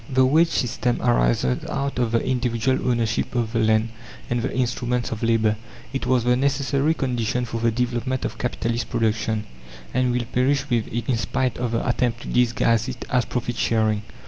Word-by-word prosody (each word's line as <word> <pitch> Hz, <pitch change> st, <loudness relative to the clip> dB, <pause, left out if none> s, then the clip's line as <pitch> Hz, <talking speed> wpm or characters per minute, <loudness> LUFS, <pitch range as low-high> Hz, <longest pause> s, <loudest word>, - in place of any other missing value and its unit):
The 130 Hz, -1 st, +4 dB
wage 160 Hz, +6 st, +4 dB
system 125 Hz, -4 st, -1 dB
arises -, -, +2 dB
out 140 Hz, -2 st, -2 dB
of 120 Hz, -2 st, +1 dB
the 115 Hz, -, +1 dB
individual 125 Hz, 0 st, 0 dB
ownership 115 Hz, -1 st, 0 dB
of 115 Hz, -2 st, -1 dB
the 115 Hz, -, +1 dB
land 110 Hz, 0 st, +3 dB, 0.4 s
and 120 Hz, 0 st, +1 dB
the -, -, -2 dB
instruments 125 Hz, -1 st, -1 dB
of 110 Hz, -, -4 dB
labour. 110 Hz, -2 st, +2 dB, 0.4 s
It 135 Hz, -2 st, -2 dB
was 125 Hz, -2 st, +3 dB
the 125 Hz, +1 st, +3 dB
necessary 140 Hz, +3 st, +1 dB
condition 125 Hz, -2 st, -1 dB
for 115 Hz, -1 st, -4 dB
the 115 Hz, -, +3 dB
development 125 Hz, +2 st, -1 dB
of -, -, -5 dB
capitalist 120 Hz, -1 st, -2 dB
production, 110 Hz, -1 st, 0 dB, 0.5 s
and 130 Hz, 0 st, +2 dB
will 120 Hz, -1 st, -1 dB
perish 135 Hz, +3 st, +2 dB
with 115 Hz, -3 st, 0 dB
it, 120 Hz, +1 st, -3 dB
in 125 Hz, -, +1 dB
spite 125 Hz, +4 st, -1 dB
of 120 Hz, -1 st, -2 dB
the 115 Hz, -, -1 dB
attempt 120 Hz, -1 st, 0 dB
to -, -, -7 dB
disguise 115 Hz, -1 st, +2 dB
it 125 Hz, -1 st, -6 dB
as 125 Hz, -3 st, +2 dB
"profit 120 Hz, 0 st, -3 dB
sharing." 110 Hz, -2 st, +1 dB
120 Hz, 185 wpm, -23 LUFS, 115-130 Hz, 0.5 s, The